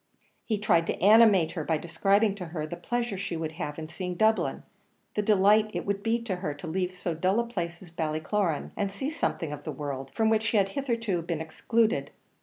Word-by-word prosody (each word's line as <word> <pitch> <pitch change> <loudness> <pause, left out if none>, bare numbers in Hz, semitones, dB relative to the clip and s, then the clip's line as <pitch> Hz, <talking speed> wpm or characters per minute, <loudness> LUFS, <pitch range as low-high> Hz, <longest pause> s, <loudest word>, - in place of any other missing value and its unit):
He 220 - 0
tried 185 -6 +2
to - - -2
animate 205 -4 +6
her 160 - -4
by 160 +1 +1
describing 195 +6 +2
to 195 -3 -7
her 160 -2 -4
the 155 - -6
pleasure 240 -1 -2
she 195 -4 -3
would 160 -1 -3
have 155 -3 -5
in 160 -1 -5
seeing 180 +2 -5
Dublin 220 +4 +2 0.5
the 210 - 0
delight 210 +1 +4
it - - -2
would 200 0 -1
be 225 +3 +1
to 195 -6 -2
her 155 -6 -3
to 145 - -9
leave 180 +2 -1
so 180 -1 -3
dull 185 +6 +1
a 235 - +1
place 175 -7 -4
as 175 - -14
Ballycloran, 160 +2 -1
and 200 -1 -1
see 265 +9 -3
something 165 - -2
of 145 0 -8
the - - -4
world, 135 -2 -5
from 220 -1 +3
which 220 -1 +3
she 220 0 +1
had 195 -1 +3
hitherto 230 -7 -1
been 165 -1 -3
excluded. 160 - 0
190 Hz, 215 wpm, -28 LUFS, 165-215 Hz, 0.5 s, animate